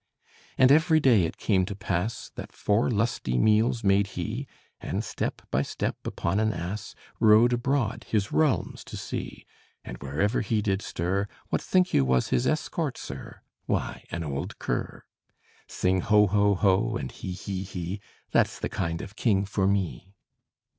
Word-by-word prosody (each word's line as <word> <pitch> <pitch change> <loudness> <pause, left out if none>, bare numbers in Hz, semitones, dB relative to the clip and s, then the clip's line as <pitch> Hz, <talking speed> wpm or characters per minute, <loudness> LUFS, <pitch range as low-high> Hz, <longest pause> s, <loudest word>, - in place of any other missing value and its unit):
And 130 0 +6
every 160 +2 +5
day 120 - +5
it 80 - -5
came 95 -4 +2
to 100 - -4
pass, 100 +3 -3
That - - -8
four 105 +5 +1
lusty 105 - 0
meals 110 - +3
made 100 0 +3
he; 110 +10 -3 0.3
And - - -3
step - - -4
by 70 - +2
step, - - -2
upon 95 +4 -1
an 110 0 +2
ass, 95 +2 -5 0.2
Rode 110 +3 +6
abroad, 120 -2 0
his 100 -3 0
realms 155 -3 +1
to - - -7
see; - - -6 0.4
And - - -8
wherever 80 - 0
he 110 0 0
did 100 -1 0
stir, 95 +3 -1 0.2
What - - 0
think 185 -1 +2
you 70 - +5
was 65 -1 +2
his 60 - +1
escort, - - -1
sir? - - -8 0.3
Why, - - -2
an 85 0 -3
old 70 -3 -4
cur. - - -3 0.6
Sing 95 0 +1
ho, 105 +2 +5
ho, 100 +1 +3
ho! 95 0 +2
and 65 -2 -5
he, 90 - -6
he, 95 +1 -4
he! 90 +1 -5 0.3
That's - - +2
the - - -3
kind 85 -3 -2
of 100 - -10
king 100 -5 +2
for 100 -1 0
me. 95 0 -1
100 Hz, 165 wpm, -27 LUFS, 90-110 Hz, 0.6 s, And